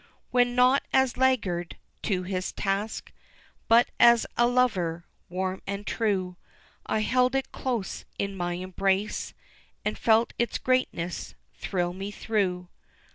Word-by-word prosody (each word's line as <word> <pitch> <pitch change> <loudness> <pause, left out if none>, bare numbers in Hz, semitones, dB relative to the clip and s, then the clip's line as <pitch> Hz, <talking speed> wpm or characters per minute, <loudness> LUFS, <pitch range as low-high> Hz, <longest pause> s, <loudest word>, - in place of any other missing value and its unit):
When, 245 -1 +3
not 250 +2 +5
as 265 -2 +3
laggard 205 -10 0 0.2
to 185 -4 -1
his 185 0 -3
task, 200 +2 -2 0.6
But 235 +2 +5
as 235 -1 +7
a 240 - +4
lover 185 -10 +1 0.2
warm 185 +1 -2
and 200 +1 -4
true, 190 -6 -1 0.5
I 215 - +1
held 255 +3 +2
it 270 -1 -1
close 240 -7 -3
in 200 0 -2
my 175 -1 -2
embrace, 190 +3 -1 0.5
And 210 - 0
felt 225 +1 +3
its 235 - 0
greatness 180 -9 -1 0.2
thrill 175 - -2
me 195 +2 -5
through. 195 -4 -1
200 Hz, 130 wpm, -27 LUFS, 185-240 Hz, 0.6 s, as